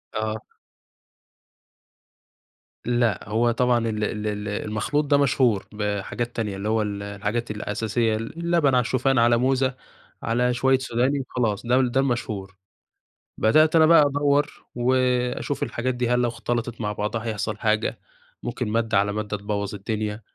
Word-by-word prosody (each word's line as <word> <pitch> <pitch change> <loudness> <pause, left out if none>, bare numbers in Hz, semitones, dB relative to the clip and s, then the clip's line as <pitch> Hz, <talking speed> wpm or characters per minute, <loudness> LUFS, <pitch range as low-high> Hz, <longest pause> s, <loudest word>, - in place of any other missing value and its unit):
آه. 110 0 -2 2.4
لأ، 120 -4 +1
هو 115 +2 +2
طبعًا 120 -1 +2
ال 105 -1 -2
ال 105 0 -2
ال 105 0 -3
المخلوط 110 +8 -1
ده 145 0 +3
مشهور 125 -7 +2
بحاجات 105 +3 -3
تانية، 105 -4 -2
اللي 100 +2 -3
هو 110 0 +2
ال 100 -1 -3
الحاجات 105 +3 -3
الأساسية، 110 +2 -1
اللبن 160 +5 0
على - - +5
الشوفان 130 +2 +1
على 120 0 +4
موزة 130 +1 +1 0.5
على 125 +2 +1
شويّة 130 +2 +3
سوداني 130 +2 0
وخلاص 120 -5 -2
ده 125 +2 +3
ده 130 +1 +1
المشهور. 110 -7 -2 0.8
بدأت 155 +9 +4
أنا 160 -1 +7
بقى 165 -1 +7
أدور 145 +1 0
وأشوف 125 +2 0
الحاجات 125 +1 -2
دي 120 -1 -1
هل 125 0 +3
لو 120 - +2
اختلطت 120 0 -3
مع 105 -2 -1
بعضها 105 +2 -3
هيحصل 110 -1 -3
حاجة، 110 -1 0 0.4
ممكن 125 - -3
مادة 110 -1 +1
على 100 +1 +2
مادة 105 0 -3
تبوظ 100 0 -3
الدنيا 105 +1 -3
115 Hz, 145 wpm, -24 LUFS, 105-130 Hz, 2.4 s, أنا